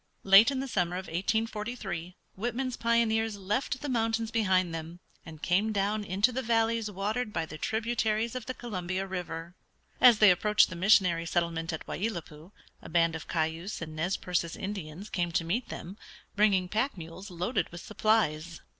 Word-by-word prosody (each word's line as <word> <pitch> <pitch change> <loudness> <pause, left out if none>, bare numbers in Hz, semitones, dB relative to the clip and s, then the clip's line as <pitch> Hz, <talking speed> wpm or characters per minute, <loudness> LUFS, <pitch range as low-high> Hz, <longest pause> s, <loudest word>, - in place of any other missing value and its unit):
Late 195 +5 +8
in 270 -2 -2
the 270 - -4
summer 180 -7 0
of 185 +1 -4
1843 205 -1 -3 0.2
Whitman's 245 +4 -2
pioneers 225 -2 +1
left 210 +6 -2
the 295 - -4
mountains 225 -3 0
behind 185 -6 +2
them, 165 +2 -6 0.3
and 160 -1 -11
came 200 +5 +2
down 205 +1 0
into 200 +5 +2
the 260 +2 -2
valleys 225 -2 +1
watered 210 +4 -2
by 165 -4 -2
the 155 -1 -9
tributaries 225 0 0
of 255 -3 -6
the 255 - -4
Columbia 185 -4 -3
River. 175 -3 -5 0.5
As 245 -3 +8
they 210 -2 +7
approached 205 +2 +3
the - - -5
missionary 175 -3 +3
settlement 165 -1 -1
at 160 - -6
Wai - - -4
i - - +3
lat 175 -8 -5
pui 155 +5 -14 0.3
a - - -10
band 165 0 +2
of 160 - -7
Cayuse 165 +4 -2
and 155 -1 -7
Nez 175 +5 -1
Percés 170 -2 -2
Indians 195 -2 -6
came 175 -4 -1
to 175 -1 +1
meet 225 +9 -1
them, 190 +5 -8 0.4
bringing 200 -3 +3
pack 220 +5 -1
mules 170 +4 -9
loaded 180 +7 -1
with 170 0 -8
supplies. 170 -8 0
195 Hz, 180 wpm, -29 LUFS, 170-225 Hz, 0.5 s, Late